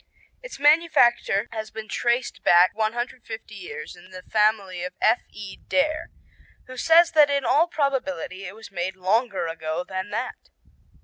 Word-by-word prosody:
"Its - - -9
manufacture 285 -8 +3
has 220 -1 -5
been 220 -1 -8
traced 240 +2 -1
back 175 +1 +5
150 225 0 -4
years 180 -5 -8
in 175 +1 -17
the 185 -1 -10
family 210 -4 0
of 180 0 -5
F.E. 210 -3 -1
Dare, 310 +3 0 0.6
who 255 - -11
says 330 +5 +5
that 300 -2 +5
in 280 -2 0
all 300 +6 +3
probability 220 - -2
it 195 - -9
was 220 -2 -12
made 185 0 -3
longer 195 +1 0
ago 160 0 -4
than 190 +1 -4
that." - - -5
220 Hz, 145 wpm, -24 LUFS, 185-265 Hz, 0.6 s, back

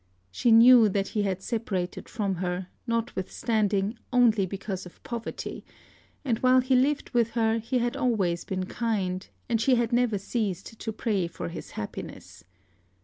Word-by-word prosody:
She 235 - +2
knew 230 0 +8
that 195 0 -1
he 210 - -1
had 190 -2 -2
separated 195 -6 -3
from 205 -5 -1
her, 180 0 -3 0.2
notwithstanding, 220 -1 -1
only 225 -6 +4
because 190 -1 -5
of 180 - -18
poverty; 235 -1 -5 0.6
and 235 -5 0
while 255 0 +5
he 255 +1 +2
lived 275 +3 +1
with 235 -2 +2
her, 225 0 +2
he 235 +3 -1
had 240 0 0
always 195 -9 0
been 185 -1 -3
kind; 195 -4 -2 0.2
and 230 -2 +1
she 260 +2 +4
had 235 -1 0
never 240 -3 +2
ceased 210 +1 -3
to 220 - -3
pray 210 -5 -1
for 170 - -6
his 170 - -8
happiness. 105 - -7
220 Hz, 155 wpm, -27 LUFS, 190-235 Hz, 0.6 s, knew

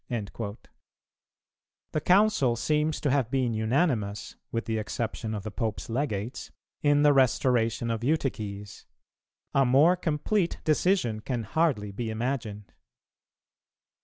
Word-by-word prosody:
"[305:1] 105 -2 -4 1.3
The 155 - -1
Council 185 - +3
seems 150 +5 0
to 145 - +1
have 130 -4 +1
been 125 -3 0
unanimous, 110 - 0 0.2
with 115 - -2
the 110 -1 -1
exception 110 0 -3
of 100 - -5
the 110 - -5
Pope's 110 0 -3
Legates, 120 -3 -3 0.3
in 145 0 +3
the 145 -1 +6
restoration 120 -3 +2
of 115 0 -3
Eutyches; 110 -9 -3 0.7
a 135 - +4
more 140 +8 +5
complete 175 +3 -1
decision 155 - +1
can 120 +1 -3
hardly 115 -5 0
be 110 +3 -4
imagined. 110 -3 -4
120 Hz, 120 wpm, -27 LUFS, 110-145 Hz, 1.3 s, the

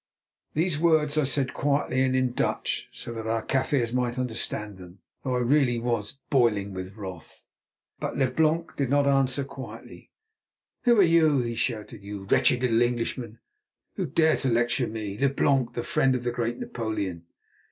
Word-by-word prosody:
These 160 -1 +1
words 155 -3 +3
I 155 -2 +2
said 135 -1 +1
quite - - -9 0.2
quietly 130 +1 -1
and 130 -1 +2
in 130 -1 +1
Dutch, - - -2
so 120 - -7
that 110 -1 -5
our 115 0 0
Kaffirs 130 -3 0
might 125 -1 0
understand 110 -5 -2
them, 90 +1 -12 0.3
though 130 - -1
really 125 +1 +3
I - - -4
was 115 0 -2
boiling 105 -7 +2
with 95 +1 -7
wrath. 95 -6 -9 0.5
But - - -3
Leblanc 155 +5 +1
did 140 -3 -1
not 145 +1 +3
answer 135 0 +2
quietly. 125 -5 -10 0.8
"Who 240 -1 +5
are - - +8
you," 160 -5 +4
he 115 -1 -3
shouted, 110 -1 -3
"you 100 0 -7
wretched 125 +5 +3
little 115 -2 +3
Englishman, 120 -1 -2 0.5
who - - -2
dare 160 -1 +3
to 135 - -1
lecture 120 +2 +1
me, 105 -2 -5
Leblanc, 135 -2 +2
the 120 - -3
friend 130 -1 +2
of 125 - -3
the 120 - -1
great 120 0 -2
Napoleon?" 100 -7 -4
125 Hz, 170 wpm, -26 LUFS, 110-140 Hz, 0.8 s, are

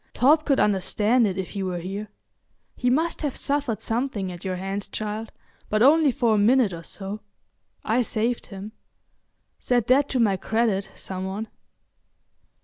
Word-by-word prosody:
Torp 300 +5 +4
could 275 -3 +2
understand 210 +4 +2
it 190 -1 -3
if 190 -2 -4
he 200 - -4
were 185 -2 -2
here; 195 +5 -5 0.7
he 250 - 0
must 320 +6 +1
have 290 -4 -2
suffered 280 -6 -1
something 225 -5 -2
at 175 -1 -10
your 185 -1 -2
hands, 195 +2 -4
child, 215 +1 -5 0.4
but 215 +1 +2
only 300 +1 +6
for 235 -2 +1
a - - +3
minute 225 -1 +4
or 165 - -6
so. 195 +4 -6 0.6
I 230 +3 +2
saved 235 +1 -1
him. 200 +1 -8 0.9
Set 245 -3 +1
that 275 +2 +4
to 260 - 0
my 205 -5 +3
credit, 220 -1 0
some 190 0 -5
one." 205 +4 -4
215 Hz, 160 wpm, -24 LUFS, 195-250 Hz, 0.9 s, only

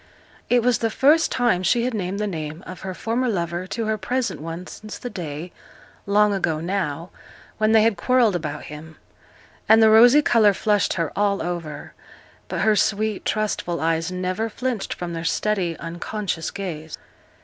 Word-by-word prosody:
It 245 -1 +3
was 250 -1 +2
the 225 - 0
first 300 +8 +3
time 240 -8 +2
she 235 +6 +2
had 250 0 -1
named 195 -1 -3
the 210 - 0
name 160 -3 -5
of 185 - -8
her 190 -1 -5
former 240 +5 -1
lover 175 -2 -2
to 225 +3 -3
her 215 0 -1
present 245 - -2
one 165 +3 -6
since 215 +3 -9
the 245 - -7
day, 165 -1 -6 0.6
long 205 +1 +4
ago 170 -5 0
now, 170 -2 -3 0.5
when 215 0 +3
they 220 -1 +6
had 225 -3 +2
quarrelled 235 0 +3
about 150 -3 -4
him; 155 +2 -10 0.7
and 220 0 +8
the 220 -1 +6
rosy 245 +7 +7
colour 215 -6 +4
flushed 205 -1 +1
her 165 -3 -2
all 200 0 +1
over; 160 -4 -5 0.5
but - - -3
her 215 -1 +4
sweet, 215 0 0
trustful 210 -5 -1
eyes 165 +1 0
never 185 +5 -2
flinched 240 -1 -3
from 175 -1 -5
their 165 0 -4
steady, 180 -2 0
unconscious 170 +1 -4
gaze. 160 -5 -6
195 Hz, 170 wpm, -23 LUFS, 170-220 Hz, 0.7 s, and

